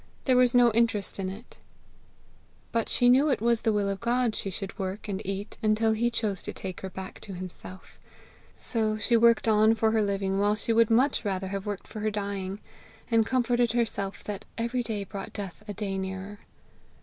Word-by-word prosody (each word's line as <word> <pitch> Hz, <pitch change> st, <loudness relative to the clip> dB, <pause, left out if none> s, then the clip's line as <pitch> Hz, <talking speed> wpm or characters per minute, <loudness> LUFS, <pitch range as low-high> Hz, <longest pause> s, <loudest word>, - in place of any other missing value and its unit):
there 260 Hz, -, +4 dB
was 250 Hz, 0 st, +4 dB
no 240 Hz, -1 st, +6 dB
interest 220 Hz, -3 st, 0 dB
in 190 Hz, -1 st, -2 dB
it! 210 Hz, +6 st, -11 dB, 1.1 s
But 230 Hz, -1 st, 0 dB
she 245 Hz, -, +3 dB
knew 265 Hz, +5 st, +5 dB
it 270 Hz, -, +1 dB
was 235 Hz, +1 st, +2 dB
the 225 Hz, -, +2 dB
will 205 Hz, -1 st, +1 dB
of 195 Hz, -1 st, -2 dB
God 240 Hz, -1 st, +1 dB
she 195 Hz, -, -3 dB
should 195 Hz, +1 st, -5 dB
work 190 Hz, +3 st, -4 dB
and 200 Hz, 0 st, -3 dB
eat 195 Hz, +2 st, -5 dB
until 220 Hz, 0 st, +2 dB
he 230 Hz, +2 st, +1 dB
chose 215 Hz, -5 st, -2 dB
to -, -, -6 dB
take 185 Hz, -2 st, -6 dB
her 190 Hz, -, -5 dB
back 190 Hz, +1 st, -8 dB
to 200 Hz, -, -8 dB
himself; 185 Hz, +1 st, -10 dB, 0.6 s
so 220 Hz, -2 st, 0 dB
she 235 Hz, +2 st, +2 dB
worked 230 Hz, 0 st, +5 dB
on 220 Hz, +1 st, +5 dB
for 220 Hz, 0 st, +2 dB
her 220 Hz, -1 st, +2 dB
living 195 Hz, -1 st, 0 dB
while 205 Hz, +1 st, +3 dB
she 225 Hz, +2 st, -1 dB
would 230 Hz, -1 st, +4 dB
much 255 Hz, +5 st, +3 dB
rather 190 Hz, -2 st, -2 dB
have 195 Hz, +1 st, -4 dB
worked 205 Hz, -2 st, -4 dB
for 215 Hz, -, -7 dB
her 215 Hz, +1 st, 0 dB
dying; 200 Hz, -2 st, -3 dB, 0.5 s
and 225 Hz, -1 st, +4 dB
comforted 245 Hz, -2 st, +2 dB
herself 205 Hz, -4 st, -1 dB
that 205 Hz, -2 st, -5 dB
every 235 Hz, +2 st, 0 dB
day 220 Hz, -3 st, -3 dB
brought 195 Hz, 0 st, -7 dB
death 200 Hz, -1 st, -6 dB
a 205 Hz, -, -4 dB
day 195 Hz, -1 st, -2 dB
nearer. 190 Hz, +2 st, -5 dB
215 Hz, 200 wpm, -28 LUFS, 195-230 Hz, 1.1 s, no